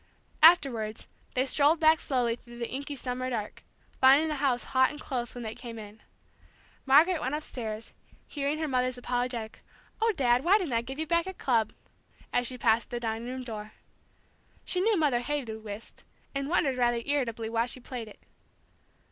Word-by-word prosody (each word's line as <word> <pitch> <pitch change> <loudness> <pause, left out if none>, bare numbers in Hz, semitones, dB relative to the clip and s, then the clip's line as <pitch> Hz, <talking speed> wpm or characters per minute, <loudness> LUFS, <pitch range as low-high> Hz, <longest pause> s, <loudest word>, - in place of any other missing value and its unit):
Afterwards, 265 -10 +4 0.3
they 255 +1 +2
strolled 290 +4 +3
back 315 -1 +5
slowly 245 -4 0
through 240 0 -14
the 235 -1 -3
inky 280 +2 -4
summer 255 -1 -3
dark, 220 -4 -4 0.4
finding 275 +4 +6
the 305 - -2
house 265 -3 +1
hot 260 0 +5
and 295 - -8
close 245 -3 -3
when 245 - -6
they 220 -1 -4
came 230 -1 -9
in. 210 0 -10 0.9
Margaret 315 +5 +5
went 260 +4 -1
upstairs, 225 -7 -5 0.3
hearing 285 +1 -2
her 315 0 -2
mother's 255 -2 0
apologetic, 245 -2 -3 0.4
"Oh, 455 0 +4
Dad, 250 -3 +3
why 375 +5 +5
didn't 350 - -3
I 230 - +2
give 265 +3 -7
you 315 - -2
back 335 +3 +1
your 380 - -5
club?" 230 -8 +1 0.6
as 245 -1 +2
she 255 - -3
passed 230 -1 +2
the 240 - -3
dining 225 0 -3
room 255 +1 -5
door. 215 -3 -7 0.9
She 365 - +1
knew 430 +1 +3
Mother 290 -7 +2
hated 240 -5 -4
whist, 210 +1 -9 0.3
and 275 0 -2
wondered 280 -6 +2
rather 240 -1 +1
irritably 235 -6 -1
why 230 +1 0
she 255 - -4
played 245 -2 -7
it. 210 - -14
255 Hz, 180 wpm, -29 LUFS, 235-290 Hz, 0.9 s, finding